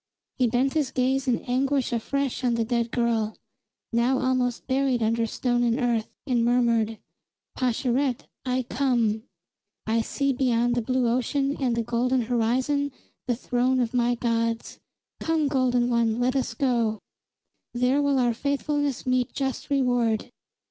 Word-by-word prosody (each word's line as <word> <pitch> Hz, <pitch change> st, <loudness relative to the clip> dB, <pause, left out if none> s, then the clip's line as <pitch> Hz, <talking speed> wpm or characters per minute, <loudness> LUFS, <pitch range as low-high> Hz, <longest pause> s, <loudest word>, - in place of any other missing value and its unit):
He 250 Hz, -, +4 dB
bent 255 Hz, +4 st, +1 dB
his 300 Hz, -4 st, +1 dB
gaze 265 Hz, +1 st, 0 dB
in 245 Hz, -2 st, +1 dB
anguish 265 Hz, +1 st, 0 dB
afresh 275 Hz, +3 st, -2 dB
on 245 Hz, -2 st, +2 dB
the 230 Hz, -1 st, 0 dB
dead 235 Hz, 0 st, 0 dB
girl, 230 Hz, -3 st, 0 dB, 0.6 s
now 240 Hz, +3 st, +2 dB
almost 255 Hz, -2 st, 0 dB
buried 260 Hz, -2 st, +1 dB
under 230 Hz, +1 st, +1 dB
stone 240 Hz, +1 st, 0 dB
and 240 Hz, +1 st, +1 dB
earth, 235 Hz, -3 st, 0 dB, 0.2 s
and 245 Hz, -4 st, +1 dB
murmured: 230 Hz, -2 st, +2 dB, 0.6 s
"Pascherette, 255 Hz, +1 st, 0 dB, 0.2 s
I 255 Hz, 0 st, 0 dB
come! 235 Hz, -3 st, 0 dB, 0.6 s
I 225 Hz, +1 st, +1 dB
see 275 Hz, +4 st, -1 dB
beyond 245 Hz, -2 st, +1 dB
the 240 Hz, -, +1 dB
blue 255 Hz, +1 st, 0 dB
ocean 275 Hz, +4 st, 0 dB
and 250 Hz, -4 st, +1 dB
the 230 Hz, -, 0 dB
golden 245 Hz, +2 st, +1 dB
horizon 250 Hz, +5 st, 0 dB, 0.4 s
the 245 Hz, -, +1 dB
throne 250 Hz, +2 st, 0 dB
of 240 Hz, -1 st, 0 dB
my 245 Hz, 0 st, +2 dB
gods. 230 Hz, -1 st, -1 dB, 0.4 s
Come, 320 Hz, -2 st, +1 dB
golden 255 Hz, -3 st, +2 dB
one, 235 Hz, -1 st, +1 dB
let 250 Hz, +2 st, +1 dB
us 255 Hz, -4 st, -1 dB
go. 235 Hz, -4 st, +1 dB, 0.8 s
There 250 Hz, +4 st, +2 dB
will 285 Hz, -1 st, +2 dB
our 245 Hz, -2 st, +2 dB
faithfulness 285 Hz, +1 st, -1 dB
meet 255 Hz, -1 st, +1 dB
just 270 Hz, +1 st, -3 dB
reward!" 245 Hz, -5 st, +1 dB
245 Hz, 150 wpm, -25 LUFS, 235-265 Hz, 0.8 s, He